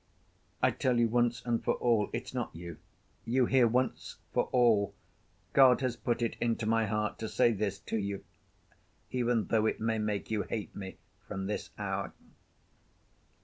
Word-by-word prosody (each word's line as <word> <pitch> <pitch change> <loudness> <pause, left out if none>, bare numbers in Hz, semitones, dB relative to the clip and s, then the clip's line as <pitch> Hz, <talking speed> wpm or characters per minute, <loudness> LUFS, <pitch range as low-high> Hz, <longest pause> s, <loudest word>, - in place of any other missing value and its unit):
I - - +5
tell 125 -2 +1
you 120 - +4
once 120 +1 +1
and 120 -1 0
for - - +1
all, 115 -4 +2
it's - - -5
not - - -3
you. 85 0 -8 0.5
You 125 +2 +2
hear, 125 -1 +4
once 125 +1 -1 0.2
for - - +2
all! 115 -5 +3 0.6
God 130 -2 +6
has 130 -2 0
put 120 0 -1
it 115 - -1
into 115 -1 0
my 115 0 +2
heart 105 +1 -1
to 110 - -4
say 120 - +3
this 100 -2 -1
to 110 - -3
you, 100 -1 -3 0.9
even 120 -3 +1
though 110 -1 +2
it - - -1
may 110 0 0
make 105 0 -2
you 110 -2 +1
hate 110 -1 -5
me 95 -2 -7 0.3
from 95 0 -4
this 105 - -3
hour." - - -3
115 Hz, 170 wpm, -31 LUFS, 105-120 Hz, 0.9 s, God